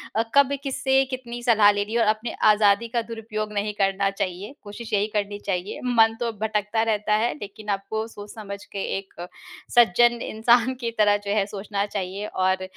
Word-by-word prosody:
अ, 225 - +2
कब 280 0 +5
किससे 270 -1 +2
कितनी 240 -2 -6
सलाह 220 -4 +5
लेनी 205 +1 -3
है 235 - +2
और 225 - +2
अपनी 220 +2 -6 0.2
आज़ादी 210 +1 +3
का - - +3
दुरुपयोग 220 -2 -5
नहीं 210 +1 -1
करना 195 0 +2
चाहिए, 195 +3 -4
कोशिश 215 +2 -9
यही 205 0 +2
करनी 205 0 -2
चाहिए। 185 0 -2
मन 225 -2 +4
तो 235 -1 -1
भटकता 215 0 0
रहता 210 0 +1
है 240 - 0
लेकिन 205 +1 -9
आपको 220 +3 -4
सोच-समझ 205 -2 -9
के 200 - -5
एक 195 0 -9 0.6
सज्जन 240 +1 +5
इंसान 235 +3 +2
की 235 -1 -2
तरह 205 -1 +4
जो - - 0
है 205 -2 +2
सोचना 200 0 -3
चाहिए, 200 0 -4
और 185 -1 0
210 Hz, 180 wpm, -24 LUFS, 200-230 Hz, 0.6 s, कब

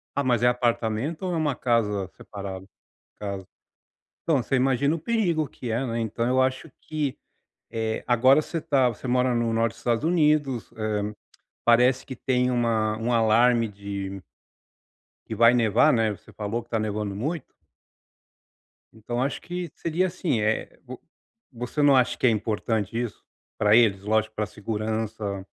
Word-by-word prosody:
Ah, 140 - +1
mas 120 -2 +1
é - - +6
apartamento 120 - 0
ou 180 -1 -1
é - - 0
uma 150 -5 0
casa 105 -6 0
separada, 95 -2 -7
no 95 - -18 0.5
caso? 100 -2 -5 0.8
Então 150 -6 +2
você 135 - -3
imagina 135 +3 +2
o - - -3
perigo 170 - 0
que 120 - -7
é, 125 +4 0
né, 115 -1 -2
então 115 +1 -2
eu 130 +1 +3
acho 130 +4 0
que 150 -4 -3 0.5
eh 110 -1 -2
agora 130 +5 +5
você 165 - -5
está 135 -5 +2
você 120 +3 -7
mora 125 0 +2
no 115 -1 0
norte 115 0 +1
Estados 120 +3 -1
Unidos, 150 -7 +1
ah, 105 -1 -2 0.5
parece 125 +2 +4
que 130 - -7
tem 125 0 +1
uma 115 -3 +1
um 115 +2 -2
alarme 115 +1 +4
de 100 -1 -6 1.1
que 110 - -5
vai 115 +2 +6
nevar 120 +5 +4
né 110 -2 +2
você - - -18
falou 110 +3 -3
que 115 - -20
está 115 - -1
nevando 105 -2 -2
muito. 150 +7 -3 1.5
Então 120 +3 -4
acho 135 +1 -2
que 175 0 -5
seria, 170 +3 0
assim, 165 -10 -1
eh, 110 +1 -1
vo 130 -1 -9 0.6
você 125 +5 -3
não 140 -2 +6
acha 125 -1 +2
que - - 0
é - - +7
importante 110 0 -1
isso 120 -3 -5 0.4
para 105 +1 +5
eles 105 -5 +4
lógico 110 +1 +1
para 105 - -1
a - - -12
segurança? 110 -2 -3
120 Hz, 165 wpm, -25 LUFS, 110-130 Hz, 1.5 s, é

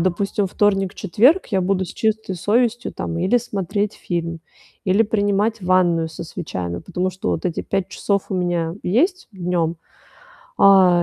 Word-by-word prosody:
допустим, 195 +3 0
вторник, 195 -1 +1
четверг 245 - +3
я 195 -4 0
буду 190 0 +1
с - - -9
чистой 220 -3 -1
совестью, 235 +6 +1
там, 165 - -4
или 190 +8 +3
смотреть 205 -2 -2
фильм, 170 -1 -4 0.4
или 195 +3 +4
принимать 205 0 0
ванную 175 -3 +2
со 160 - -8
свечами, 90 - -5
потому 180 - -2
что 185 +2 -3
вот - - -1
эти 175 - -2
5 195 -2 -2
часов 200 -2 -1
у - - -1
меня 175 -2 -1
есть 350 - +1
днём, 175 -3 -1 0.8
а, 185 -3 +6
190 Hz, 150 wpm, -21 LUFS, 175-205 Hz, 0.8 s, а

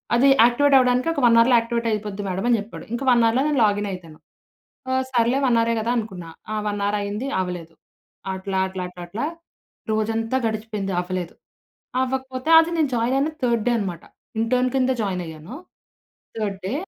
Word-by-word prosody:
"అది 260 +4 +4 0.2
యాక్టివేట్ 275 +4 +4
అవ్వడానికి 250 +2 +2
ఒక 285 - -2
1 230 -1 +6
అవర్‌లో 240 +1 +5
యాక్టివేటయిపోద్ది 220 -3 -2
మ్యాడం" 190 +4 -2
అని 235 - +4
జెప్పాడు. 210 +2 -9
ఇంక 240 - -3
1 235 -1 +4
అవర్‌లో 245 +4 +2
నేను 290 -4 +1
లాగినయితాను. 190 -6 -3 0.7
ఆ! - - 0 0.2
సర్లే 240 +1 +2
1 240 -2 +3
అవరె 230 0 +1
కదా! 235 +2 -1
అనుకున్నా. 190 -7 -5 0.2
ఆ - - -1
1 205 -1 -2
అవరయింది 205 +4 -2
అవ్వలేదు. 175 -3 -4 0.6
అట్లా, 190 0 -4
అట్లా 185 -1 -5 0.2
అట్లా 215 +10 -3 0.7
రోజంతా 225 +3 -1
గడిచిపోయింది. 215 -3 -4
అవ్వలేదు. 180 -1 -4 0.7
అవ్వకపోతే 260 +1 -3
అది 325 - +2
నేను 310 -4 +2
జాయినయిన 265 +6 +1
థర్డ్ 235 -3 +1
డే - - +4
అనమాట. 185 -6 -4 0.4
ఇంటర్న్ 250 +2 +1
కింద 260 -1 +2
జాయినయ్యాను. 180 0 -5 0.8
Third 205 -3 -2
day 200 - -2
225 Hz, 155 wpm, -23 LUFS, 195-250 Hz, 0.8 s, 1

